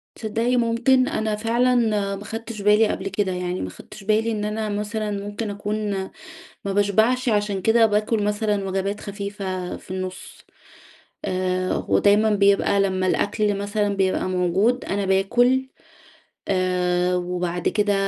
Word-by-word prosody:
تصدقي 230 Hz, +3 st, -1 dB
ممكن، 245 Hz, +2 st, +3 dB
أنا 215 Hz, -1 st, -1 dB
فعلًا 235 Hz, +3 st, +2 dB, 0.4 s
ما 200 Hz, -, -9 dB
خدتش 225 Hz, -1 st, -6 dB
بالي 210 Hz, +2 st, +5 dB
قبل 195 Hz, -1 st, -3 dB
كده، 195 Hz, -1 st, -1 dB
يعني 180 Hz, 0 st, -3 dB
ما 95 Hz, -, -4 dB
خدتش 195 Hz, -, -13 dB
بالي 220 Hz, +2 st, +2 dB
إن 210 Hz, -1 st, -2 dB
أنا 215 Hz, +1 st, -2 dB
مثلًا 210 Hz, +1 st, -3 dB
ممكن 205 Hz, +2 st, -4 dB
أكون 205 Hz, +1 st, -3 dB, 0.8 s
ما 195 Hz, -, -1 dB
باشبعش، 220 Hz, +5 st, +2 dB
عشان 205 Hz, -3 st, 0 dB
كده 225 Hz, +2 st, +4 dB
باكل 210 Hz, 0 st, +1 dB
مثلًا 210 Hz, -1 st, 0 dB
وجبات 195 Hz, +2 st, -2 dB
خفيفة 200 Hz, -3 st, -5 dB
في -, -, -13 dB
النص. 185 Hz, 0 st, -6 dB, 0.8 s
آآ، 185 Hz, 0 st, -1 dB
ودايمًا 210 Hz, +2 st, +4 dB
بيبقى 200 Hz, 0 st, +3 dB
لمَّا 185 Hz, -1 st, +1 dB
الأكل 205 Hz, +1 st, +1 dB
مثلًا 205 Hz, 0 st, -1 dB
بيبقى 190 Hz, -1 st, 0 dB
موجود، 185 Hz, +7 st, +1 dB
أنا 200 Hz, 0 st, -1 dB
باكل، 245 Hz, +7 st, +2 dB, 0.8 s
آآ، 180 Hz, -1 st, +1 dB
وبعد 180 Hz, -1 st, -2 dB
كده 205 Hz, -1 st, +1 dB
205 Hz, 135 wpm, -23 LUFS, 190-220 Hz, 0.8 s, بالي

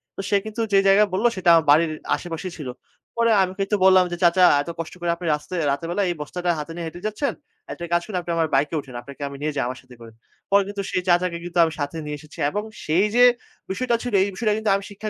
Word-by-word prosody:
তো -, -, -4 dB
সে 200 Hz, -, +4 dB
কিন্তু 220 Hz, +1 st, -4 dB
যে 195 Hz, -, +7 dB
জায়গায় 205 Hz, +2 st, +5 dB
বললো 215 Hz, +6 st, +3 dB
সেটা 180 Hz, -2 st, +1 dB
আমার 165 Hz, -2 st, +4 dB
বাড়ির 160 Hz, +1 st, +4 dB, 0.2 s
আশেপাশেই 175 Hz, +1 st, -6 dB
ছিল। 140 Hz, -5 st, -6 dB, 0.5 s
পরে 230 Hz, -1 st, +3 dB
আমি 185 Hz, 0 st, -3 dB
কিন্তু 195 Hz, +2 st, 0 dB
বললাম 185 Hz, -1 st, +6 dB
যে, 175 Hz, -, -3 dB
"চাচা 175 Hz, +2 st, +5 dB, 0.2 s
এত 170 Hz, -, -7 dB
কষ্ট 165 Hz, -, -5 dB
করে 170 Hz, 0 st, 0 dB
আপনি 175 Hz, -, -9 dB
রাস্তা 150 Hz, +5 st, -10 dB
এই -, -, -1 dB
রাতের 145 Hz, +4 st, -3 dB
বেলায় 195 Hz, +2 st, 0 dB
এই 175 Hz, -, -2 dB
বস্তাটা 175 Hz, +4 st, -4 dB
হাতে 150 Hz, +2 st, -6 dB
নিয়ে 170 Hz, -1 st, -5 dB
হেঁটে 175 Hz, +2 st, -9 dB
যাচ্ছেন। 215 Hz, +7 st, -2 dB, 0.4 s
একটা 170 Hz, -, -6 dB
কাজ 170 Hz, -, +3 dB
করুন 195 Hz, -4 st, -4 dB
আপনি 175 Hz, -, -5 dB
আমার 160 Hz, -1 st, +2 dB
বাইকে 150 Hz, +4 st, +1 dB
উঠেন। 130 Hz, -3 st, -10 dB
আপনাকে 140 Hz, +2 st, -12 dB
আমি 140 Hz, -, -8 dB
নিয়ে 155 Hz, 0 st, -2 dB
যাই -, -, 0 dB
আমার 130 Hz, 0 st, -5 dB
সাথে 130 Hz, -1 st, -16 dB
করে।" 115 Hz, -1 st, -11 dB, 0.4 s
পরে 200 Hz, 0 st, +5 dB
কিন্তু 200 Hz, -1 st, -4 dB
সেই 185 Hz, -, 0 dB
চাচাকে 175 Hz, -1 st, +2 dB
কিন্তু 175 Hz, 0 st, -6 dB
আমি 160 Hz, -, +1 dB
সাথে 145 Hz, +3 st, -3 dB
নিয়ে 150 Hz, 0 st, -4 dB
এসেছি 155 Hz, +2 st, -15 dB
এবং 210 Hz, +6 st, -3 dB, 0.2 s
সেই 170 Hz, +7 st, +3 dB
যে 245 Hz, -, +6 dB, 0.5 s
বিষয়টা 240 Hz, +3 st, 0 dB
ছিল 245 Hz, -3 st, -4 dB
এই -, -, 0 dB
বিষয়টা 215 Hz, +2 st, 0 dB
কিন্তু 220 Hz, -1 st, -1 dB
আমি 200 Hz, -, -3 dB
শিক্ষা 210 Hz, +1 st, -6 dB
175 Hz, 255 wpm, -23 LUFS, 155-200 Hz, 0.5 s, যে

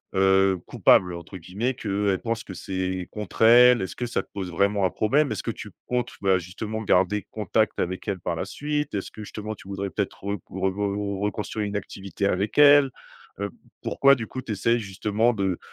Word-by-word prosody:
heu, 95 Hz, 0 st, +4 dB
«Coupable», 90 Hz, -1 st, +4 dB
heu, -, -, -5 dB
entre 85 Hz, +3 st, -9 dB
guillemets. 100 Hz, +9 st, -2 dB
Que, 100 Hz, -2 st, -1 dB
elle 95 Hz, -, 0 dB
pense 115 Hz, -1 st, -2 dB
que 95 Hz, -, -8 dB
c'est 95 Hz, 0 st, -3 dB
contre 105 Hz, -2 st, -7 dB
elle. 120 Hz, +1 st, +7 dB
Est-ce 95 Hz, -, -5 dB
que 125 Hz, -, -2 dB
ça 115 Hz, -, -1 dB
te -, -, -30 dB
pose 95 Hz, -3 st, -4 dB
vraiment 100 Hz, +2 st, +2 dB
un -, -, +3 dB
problème? 140 Hz, +5 st, +2 dB
Est-ce 105 Hz, -, -5 dB
que -, -, -2 dB
tu -, -, -9 dB, 0.2 s
comptes, 125 Hz, 0 st, -1 dB
bah, 95 Hz, -1 st, +3 dB
justement 105 Hz, +5 st, -5 dB
garder 100 Hz, +1 st, +2 dB
contact 110 Hz, 0 st, 0 dB
avec 95 Hz, +4 st, -3 dB
elle 100 Hz, -2 st, -2 dB
par 85 Hz, -1 st, -2 dB
la -, -, -2 dB
suite? 150 Hz, 0 st, -3 dB
Est-ce 100 Hz, -, -4 dB
que 110 Hz, -, -9 dB
justement 110 Hz, +1 st, -6 dB
tu 95 Hz, -, -15 dB
voudrais 100 Hz, 0 st, -4 dB
peut-être -, -, -4 dB
rec 100 Hz, 0 st, -2 dB
re -, -, -11 dB
re 95 Hz, -, -7 dB
re 100 Hz, 0 st, -1 dB
re 100 Hz, -1 st, -3 dB
reconstruire 105 Hz, +1 st, -2 dB
une 100 Hz, -, -5 dB
activité 100 Hz, 0 st, -5 dB
avec 100 Hz, +2 st, -1 dB
elle? 145 Hz, -2 st, +7 dB, 0.5 s
Heu, 100 Hz, 0 st, -2 dB
p -, -, -20 dB, 0.3 s
pourquoi 140 Hz, 0 st, +4 dB
du 115 Hz, -4 st, -5 dB
coup 130 Hz, -, -6 dB
tu 110 Hz, -, -4 dB
essayes 115 Hz, +4 st, +1 dB
justement 105 Hz, +3 st, 0 dB
de 95 Hz, -4 st, -1 dB
100 Hz, 220 wpm, -25 LUFS, 95-110 Hz, 0.5 s, elle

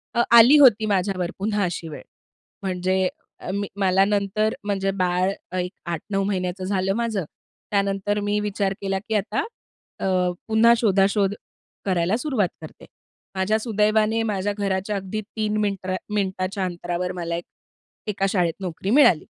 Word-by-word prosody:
अ, 235 Hz, -, +4 dB
आली 235 Hz, +5 st, +9 dB
होती 230 Hz, -6 st, +6 dB
माझ्यावर 190 Hz, -3 st, 0 dB
पुन्हा 205 Hz, 0 st, 0 dB
अशी 170 Hz, -2 st, -3 dB
वेळ. 150 Hz, -, -8 dB, 0.6 s
म्हणजे 185 Hz, 0 st, 0 dB, 0.4 s
अ, -, -, -5 dB
मी 200 Hz, 0 st, -2 dB
मला 190 Hz, 0 st, +4 dB
नंतर 205 Hz, +1 st, 0 dB
म्हणजे 195 Hz, -1 st, -1 dB
बाळ 180 Hz, +1 st, +1 dB, 0.3 s
एक 180 Hz, +1 st, -2 dB
8-9 195 Hz, +4 st, -2 dB
महिन्याचं 185 Hz, -1 st, -2 dB
झालं 190 Hz, 0 st, 0 dB
माझं. 225 Hz, -5 st, -1 dB, 0.5 s
त्यानंतर 200 Hz, 0 st, 0 dB
मी 205 Hz, 0 st, 0 dB
विचार 200 Hz, -1 st, -1 dB
केला 195 Hz, -1 st, -1 dB
की 220 Hz, -, -1 dB
आता 205 Hz, +1 st, 0 dB, 0.6 s
अ, -, -, -6 dB, 0.4 s
पुन्हा 225 Hz, +1 st, +5 dB
शोधाशोध 200 Hz, -2 st, +2 dB, 0.5 s
करायला 185 Hz, +2 st, +1 dB
सुरुवात 245 Hz, -, 0 dB
करते. 155 Hz, -, -11 dB, 0.5 s
माझ्या 195 Hz, +3 st, +1 dB
सुदैवाने 215 Hz, 0 st, +2 dB
माझ्या 205 Hz, 0 st, -1 dB
घराच्या 195 Hz, +1 st, -1 dB
अगदी 195 Hz, +2 st, -3 dB
3 215 Hz, 0 st, -3 dB
मिनत्रा 195 Hz, -3 st, -1 dB, 0.2 s
मिनिटाच्या 190 Hz, -1 st, -1 dB
अंतरावर 175 Hz, 0 st, -3 dB
मला 170 Hz, 0 st, -2 dB
एक 175 Hz, -, -5 dB, 0.6 s
1का 195 Hz, -2 st, -1 dB
शाळेत 175 Hz, -4 st, +1 dB
नोकरी 185 Hz, +1 st, -4 dB
मिळाली. 230 Hz, -, +5 dB
195 Hz, 145 wpm, -23 LUFS, 185-210 Hz, 0.6 s, आली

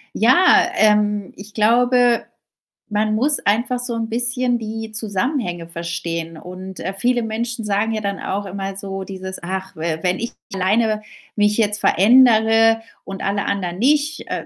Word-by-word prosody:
Ja, 350 Hz, +10 st, +5 dB
ähm, 210 Hz, -, +2 dB
ich 205 Hz, +2 st, -12 dB
glaube, 240 Hz, +2 st, +3 dB, 0.7 s
man 215 Hz, 0 st, 0 dB
muss 280 Hz, +6 st, +2 dB
einfach 235 Hz, +5 st, 0 dB
so 245 Hz, -1 st, -3 dB
'n 225 Hz, 0 st, -3 dB
bisschen 245 Hz, +1 st, 0 dB
die 220 Hz, 0 st, -6 dB
Zusammenhänge 210 Hz, -, -2 dB
verstehen. 170 Hz, -1 st, -5 dB
Und, 185 Hz, +2 st, -9 dB
äh, 190 Hz, +2 st, -4 dB
viele 240 Hz, +3 st, +1 dB
Menschen 225 Hz, +1 st, -3 dB
sagen 210 Hz, +2 st, 0 dB
ja 215 Hz, -, -2 dB
dann 200 Hz, -1 st, -3 dB
auch 200 Hz, +1 st, -3 dB
immer 195 Hz, 0 st, -5 dB
so 195 Hz, 0 st, -5 dB
dieses: 190 Hz, -1 st, -7 dB
„Ach, 190 Hz, +2 st, -5 dB
we 160 Hz, 0 st, -3 dB
wenn 180 Hz, 0 st, 0 dB
ich 235 Hz, -, -4 dB, 0.2 s
alleine 215 Hz, +3 st, +1 dB, 0.3 s
mich 210 Hz, 0 st, +2 dB
jetzt 210 Hz, -2 st, +1 dB
verändere 225 Hz, +1 st, +5 dB, 0.2 s
und 195 Hz, -1 st, -7 dB
alle 200 Hz, 0 st, -1 dB
anderen 185 Hz, -2 st, -3 dB
nicht, 295 Hz, +4 st, +1 dB
äh, -, -, -4 dB
210 Hz, 155 wpm, -20 LUFS, 190-235 Hz, 0.7 s, Ja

